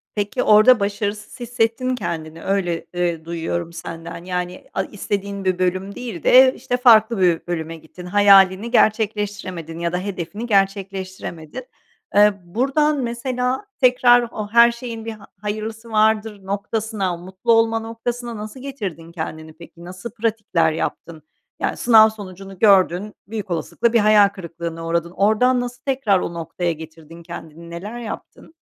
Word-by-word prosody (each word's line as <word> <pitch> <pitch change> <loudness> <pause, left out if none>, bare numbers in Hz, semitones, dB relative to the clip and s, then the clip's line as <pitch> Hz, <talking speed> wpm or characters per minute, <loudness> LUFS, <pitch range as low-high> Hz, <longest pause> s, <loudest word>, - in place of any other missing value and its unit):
Peki 205 +5 -1
orada 215 +3 +6
başarısız 205 +2 -3
hissettin 245 +1 0
kendini, 165 -7 -5
öyle, 180 -4 -1
eee, 170 -2 -1
duyuyorum 170 0 -3
senden. 165 0 -8
Yani, 180 0 -4
a - - 0
istediğin 200 -1 -4
bir 185 -1 +1
bölüm 185 +2 -1
değil 230 -10 -7
de, 260 +1 +7
işte, 245 - -2
farklı 230 -3 +5
bir 175 -2 +2
bölüme 165 -1 -4
gittin. 160 +3 -13
Hayalini 195 +2 +5
gerçekleştiremedin 205 -7 0
ya 170 0 -1
da - - +1
hedefini 190 +2 -5
gerçekleştiremedin. 195 -5 -2 0.5
Eee, 210 0 +6
buradan 275 - +1
mesela 250 - -2 0.2
tekrar 245 -1 +6
o 210 -1 -5
her 235 +1 +7
şeyin 235 -2 -7
bir 225 - -4
ha 210 -2 -12
hayırlısı 220 +2 -5
vardır 215 -2 +1
noktasına, 200 -2 -2
mutlu 185 +6 -3
olma 225 0 +3
noktasına 235 +1 -5
nasıl 215 +5 -8
getirdin 195 - -6
kendini 160 -1 -6
peki, 170 +1 -14
nasıl 185 +6 -8
pratikler 210 -8 0
yaptın? 160 0 -5 0.4
Yani, - - -1
sınav 220 -2 +6
sonucunu 195 -3 -10
gördün, 195 -1 +4
büyük 210 -3 -6
olasılıkla 225 +7 -1
bir 235 - +5
hayal 210 -1 +6
kırıklığına 170 -3 -7
uğradın. 170 0 -1
Oradan 220 +7 +3
nasıl 245 0 -6
tekrar 260 -8 +2
o 170 - -4
noktaya 170 +1 -3
getirdin 160 +1 -11
kendini, 170 -1 -10
neler 200 +8 -7
yaptın? 240 +7 -9
200 Hz, 140 wpm, -21 LUFS, 175-225 Hz, 0.5 s, de